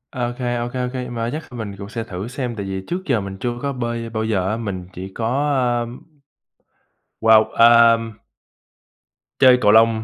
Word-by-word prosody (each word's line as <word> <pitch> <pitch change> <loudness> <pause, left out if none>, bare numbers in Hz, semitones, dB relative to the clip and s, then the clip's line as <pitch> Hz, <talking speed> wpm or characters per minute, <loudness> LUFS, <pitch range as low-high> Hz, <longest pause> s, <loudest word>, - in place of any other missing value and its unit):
OK, 120 0 -3
OK, 120 -1 -2
OK, 125 - -6 0.2
mai 115 0 -3
chắc 155 +3 -4
kh - - -16
mình 110 -4 -6
cũng 100 +1 -8
sẽ 115 -1 -4
thử 95 0 -6
xem, 125 -1 -4
tại 100 -2 -5
vì 95 0 -4
trước 180 +2 -3
giờ 115 -7 +1
mình 95 0 -7
chưa 120 - -1
có 140 -1 -2
bơi 120 -2 -4
bao 110 -1 -3
giờ 100 -4 0
á, 110 - -1
mình 95 -6 -5
chỉ 95 +2 -7
có, 135 +7 0 0.3
ưm, 120 +1 -7 1.2
wow, 110 -1 +5
à 115 0 +7 1.4
chơi 130 -1 +7
cầu 105 - +5
lông, 110 0 +4
115 Hz, 185 wpm, -20 LUFS, 105-120 Hz, 1.4 s, à